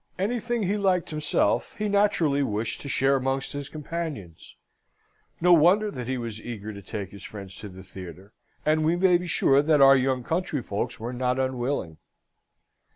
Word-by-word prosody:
Anything 235 +3 -1
he 200 +2 0
liked 185 -4 +1
himself, 155 0 0
he 210 - -1
naturally 200 -8 +2
wished 110 -3 -2
to 140 - -7
share 135 +1 +2
amongst 135 +1 -2
his 145 0 -6
companions. 150 - -6 0.8
No 180 +1 +5
wonder 185 +6 +5
that 125 -7 -6
he 130 0 -1
was 115 -3 -6
eager 110 -2 -6
to 100 - -9
take 100 -2 -6
his 100 -2 -12
friends 100 -3 -9
to 105 - -8
the 95 0 -12
theatre, 95 +2 -11 0.3
and 155 +1 +2
we 160 +2 +2
may 180 -1 +4
be 180 - -6
sure 140 -4 +3
our 135 -2 +7
young 130 -1 +1
countryfolks 145 - -2
were 120 +3 -5
not 125 0 0
unwilling. 130 - -2
135 Hz, 165 wpm, -26 LUFS, 110-170 Hz, 0.8 s, our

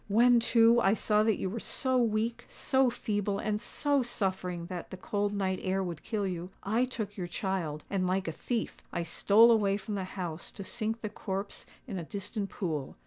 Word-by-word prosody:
_'—When, 240 +3 +6
too, 230 0 +5
I 200 -1 +4
saw 210 -1 +3
that 215 -2 +2
you - - -2
were 220 +5 -3
so 260 +3 -1
weak, 230 -1 +1
so 265 -1 +2
feeble, 205 -3 -1
and 210 0 -1
so 285 +1 +1
suffering 190 -7 -2
that 180 -1 -6
the 190 - -7
cold 205 +2 -1
night 190 -2 -1
air 190 +1 0
would 170 -4 -5
kill 215 -3 -2
you, 180 -1 -3
I 225 +5 +2
took 215 -5 -5
your 180 -2 -3
child, 175 -5 -2
and, 190 -2 0
like 190 0 0
a - - 0
thief, 230 +7 -3
I 170 - -1
stole 215 +7 +5
away 200 -3 +3
from 210 +1 -6
the 195 -2 -2
house 170 -3 -4
to 200 - -7
sink 225 +2 -3
the 215 - -3
corpse 200 -1 -5 0.2
in 200 -7 -4
a - - -4
distant 200 +3 -4
pool. 155 -8 -3
205 Hz, 200 wpm, -30 LUFS, 185-225 Hz, 0.2 s, When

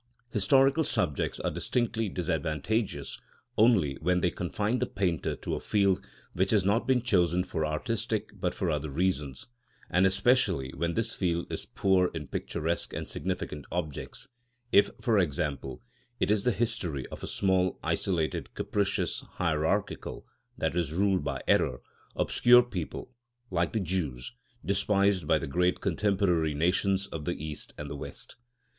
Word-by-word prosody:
Historical 135 +9 +4
subjects 80 - -1
are - - -1
distinctly 115 -3 -1
disadvantageous 85 +5 -2 0.4
only 100 - +4
when 90 +2 +2
they 90 0 +1
confine 105 +7 -1
the 125 - 0
painter 90 -7 -1
to - - -5
a - - -1
field 100 -3 +2 0.3
which 95 +2 +1
has 105 -4 +3
not 105 +4 +2
been 130 -3 +3
chosen 90 -6 +2
for 80 -3 -3
artistic 110 +8 -2
but 90 -3 -1
for 90 -3 0
other 75 0 -2
reasons, 75 -4 -1 0.4
and 90 +2 +5
especially 95 - +2
when 85 +3 -1
this 115 0 +2
field 85 -2 0
is - - -4
poor 95 -2 +2
in 75 -2 -4
picturesque 80 +4 -2
and - - -4
significant 75 -1 -4
objects—if, 120 - -1
for 110 -4 +2
example, 70 - -2 0.4
it - - +2
is 105 -2 +2
the 125 - +4
history 95 - -1
of - - -8
a - - -5
small, 95 -2 +1
isolated, 85 -5 -1
capricious, 100 -1 -1
hierarchical 85 +4 -1 0.3
(i.e., - - +1 0.2
ruled 95 -2 +2
by 70 -2 -3
error), - - +3 0.4
obscure 125 0 +5
people, 115 +2 -6 0.4
like 85 -1 +1
the 110 - 0
Jews, 80 - -3 0.3
despised 100 -3 +2
by 80 -1 +4
the 80 - -3
great 90 +5 +1
contemporary 95 -5 +1
nations 95 +5 +1
of 80 -5 -6
the 85 - -1
East 75 -1 -5
and 75 - -5
the 70 - -5
West. 70 - -7
90 Hz, 145 wpm, -29 LUFS, 80-105 Hz, 0.4 s, and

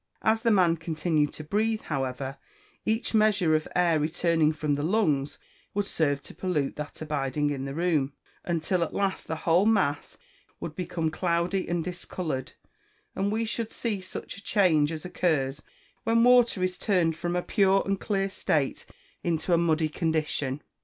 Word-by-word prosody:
As 220 0 +3
the 230 - +2
man 180 -6 +4
continued 160 -2 0
to 155 - -8
breathe, 215 +7 0
however, 135 -1 -3 0.5
each 220 +2 0
measure 210 -6 +3
of 155 0 +1
air 170 -3 +3
returning 160 0 +2
from 155 -1 -1
the 145 - -1
lungs 155 -6 +1 0.4
would 205 0 +1
serve 145 -6 0
to - - -10
pollute 160 -7 -1
that 150 0 -6
abiding 145 -1 -1
in 135 -1 -3
the 135 0 -5
room, 155 -5 +1 0.3
until 170 +1 0
at 165 - -5
last 195 -1 -1
the 160 - -2
whole 175 +5 +4
mass 190 -10 +1 0.4
would 155 - -6
become 170 -3 -2
cloudy 175 +3 0
and 175 -1 -1
discoloured, 175 -5 -4 0.6
and 200 +1 0
we 225 +2 0
should 225 0 -3
see 215 -5 -2
such 185 - -7
a 200 - -12
change 165 -9 +3
as 160 0 -6
occurs 150 -6 0 0.4
when 230 -1 +3
water 245 -6 +5
is 185 0 -1
turned 175 -6 +2
from 175 +2 -3
a 180 - 0
pure 195 -1 +3
and 195 -1 -1
clear 195 -2 0
state 150 -7 -1 0.3
into 170 +1 0
a - - +6
muddy 160 -2 +2
condition. 155 -4 -1
170 Hz, 165 wpm, -27 LUFS, 150-195 Hz, 0.6 s, a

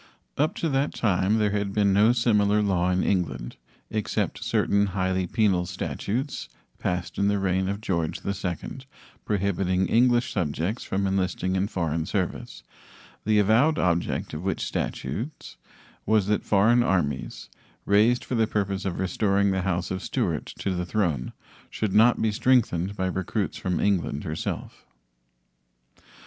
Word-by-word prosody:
Up 150 +3 +1
to 165 - -1
that 140 +1 0
time 100 0 +2
there 105 -2 +2
had 100 -1 -1
been 100 -2 +3
no 105 +4 +5
similar 105 -3 +3
law 90 -3 +1
in 90 0 +1
England, 65 -11 -1 0.3
except 110 -2 -2
certain 100 0 +2
highly 95 0 0
penal 95 -4 +1
statutes 130 - -3 0.3
passed 90 0 -3
in 100 - +3
the 100 0 +2
reign 95 -1 0
of 100 +1 -3
George 85 -7 -1
II, 95 -3 -2 0.7
prohibiting 95 -2 0
English 120 +3 +3
subjects 85 +4 -2
from 100 +1 -1
enlisting 95 -1 0
in 95 +1 +1
foreign 80 -4 -2
service, 95 -4 -3 0.6
the 105 0 +3
avowed 110 +10 +4
object 85 -1 0
of 75 - -4
which 95 +2 -2
statutes 135 +8 -4 0.5
was 110 -2 +3
that 105 +1 0
foreign 110 +4 +4
armies, 75 - -1 0.4
raised 110 +5 +3
for - - -5
the 115 -2 +2
purpose 100 -2 -2
of 95 -3 -2
restoring 100 +1 +1
the 95 -1 0
house 90 -1 -1
of 95 0 -3
Stuart - - -2
to 95 - -2
the 90 -1 -2
throne, 85 - -1 0.4
should 105 -3 -2
not 115 +3 +5
be 110 - +1
strengthened 110 -5 +2
by 95 - -1
recruits 95 +2 -2
from 90 -2 -1
England 90 -7 0
herself. 80 0 -5
100 Hz, 145 wpm, -26 LUFS, 90-110 Hz, 0.7 s, no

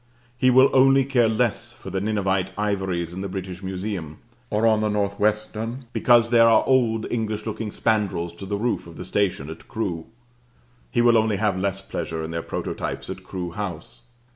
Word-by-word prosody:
He 130 +1 +3
will 130 +2 +6
only 135 0 +5
care 125 -4 +3
less 110 0 -1
for - - -10
the 95 - -1
Ninevite 95 -3 0
ivories 95 -5 -1
in 95 - -5
the 100 - -4
British 95 -1 -6
Museum: 95 -5 -4 0.3
or 105 +2 +1
on 110 -1 +4
the 110 - +1
North 100 -1 -1
Western, 110 +4 -1
because 120 -1 +4
there 115 -1 +6
are 115 - +4
old 115 -4 +2
English 110 -2 -2
looking 110 0 -4
spandrils 100 -7 0
to 95 - -8
the 100 +1 -1
roof 115 -4 -1
of 85 - -12
the - - -6
station 95 -8 0
at 80 +1 -10
Crewe? 90 -7 -3 0.8
He 120 - +1
will 120 -1 +6
only 110 -1 +1
have 105 -2 +1
less 95 +1 -1
pleasure 80 -4 -4
in 80 - -5
their 85 0 -2
prototypes - - -4
at - - -8
Crewe 90 -2 -5
House. 100 +4 -6
105 Hz, 190 wpm, -24 LUFS, 95-115 Hz, 0.8 s, will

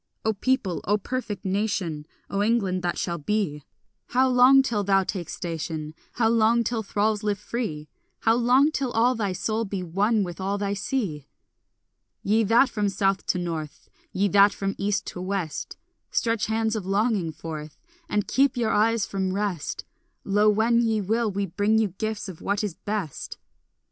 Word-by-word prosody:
O 220 - +2
people, 205 -4 0
O 205 +3 +2
perfect 210 -3 -4
nation, 190 -6 -1 0.2
O 200 - -1
England 205 -4 +1
that 175 -1 -1
shall 170 -1 -2
be, 155 -3 -1 0.5
How 260 +1 +3
long 255 +2 +6
till 220 -6 -1
thou 195 -1 +3
take 180 -3 -4
station? 160 -2 -4 0.2
How 225 -1 +2
long 230 +1 +3
till 230 0 -1
thralls 210 0 0
live 210 -2 0
free? 205 -9 -4 0.3
How 225 - +4
long 250 +5 +4
till 275 -4 -1
all 240 +3 +3
thy 210 -5 -1
soul 215 +5 -1
be 195 -3 -4
one 200 +5 +1
with 175 0 -6
all 195 +2 -1
thy 200 0 -1
sea? 200 - -3 1.0
Ye 220 +3 +3
that 230 +6 +5
from 210 -4 -1
south 195 0 0
to - - +1
north, 165 -4 -5 0.2
Ye 200 +2 +1
that 200 +1 +6
from 195 0 -2
east 200 0 0
to 180 - -6
west, 185 -4 -3 0.3
Stretch 230 -2 0
hands 220 0 0
of 215 - -3
longing 195 -2 +1
forth 155 -1 -7 0.3
And 210 -1 0
keep 270 -1 +2
your 230 -2 +1
eyes 225 0 +2
from 190 -1 -2
rest, 195 -7 -3 0.4
Lo, 205 +2 +3
when 225 +3 +3
ye 225 -2 +1
will, 220 +3 0
we 200 0 -1
bring 205 +4 +1
you 220 -2 +2
gifts 215 +3 -4
of 185 -4 -9
what 200 +1 -1
is 205 -5 -2
best. 205 -5 -5
205 Hz, 175 wpm, -25 LUFS, 185-225 Hz, 1.0 s, long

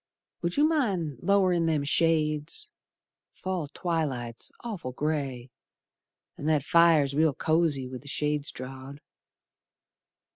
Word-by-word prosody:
Would 170 0 -2
you 295 +2 +5
mind 190 - 0
lowerin' 185 -4 +3
them 155 -3 +1
shades, 155 - 0 0.6
Fall 185 -5 -3
twilight's 140 -8 -2
awful 195 - -5
grey, 135 -4 -2 0.9
An' - - -5
that 155 -3 +2
fire's 160 -3 +5
real 155 -1 +3
cosy 155 -5 +1
with 125 -1 -7
the 145 - -15
shades 150 0 -1
drawed. 130 +2 -8
155 Hz, 110 wpm, -28 LUFS, 140-170 Hz, 0.9 s, you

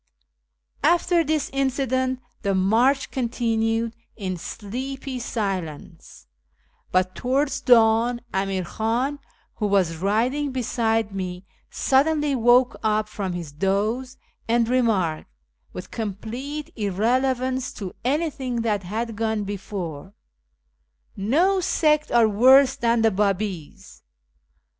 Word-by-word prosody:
After 345 +2 +3
this 310 -2 -1
incident 260 -1 0 0.2
the 200 -3 0
march 235 +9 +2
continued 230 -2 -1 0.2
in 190 -4 -3
sleepy 255 +9 -6
silence; 180 - -5 0.7
but 185 0 +1
towards 275 +4 0
dawn 235 -1 +4
Amir 190 -1 -1
Khan, 240 +9 -1 0.4
who 210 - 0
was 185 -5 +1
riding 240 - 0
beside 225 -4 0
me, 185 -1 -5 0.2
suddenly 295 +2 +2
woke 245 0 +4
up 215 0 +1
from 195 -3 -4
his 170 -4 -6
doze, 205 - -1 0.3
and 230 0 +2
remarked, 215 - +1 0.4
with 180 - -9
complete 235 +8 -5
irrelevance 255 +5 0
to 190 -3 -7
anything 265 -3 -1
that 210 -3 0
had 220 +5 -4
gone 220 -1 -1
before, 190 -4 -6 0.6
" 65 0 -46 0.2
No 380 +4 +4
sect 305 -4 +1
are 235 -2 +5
worse 260 +5 +6
than 235 -4 +1
the 225 - +4
Babis." 195 -4 -3
225 Hz, 105 wpm, -23 LUFS, 195-260 Hz, 0.7 s, worse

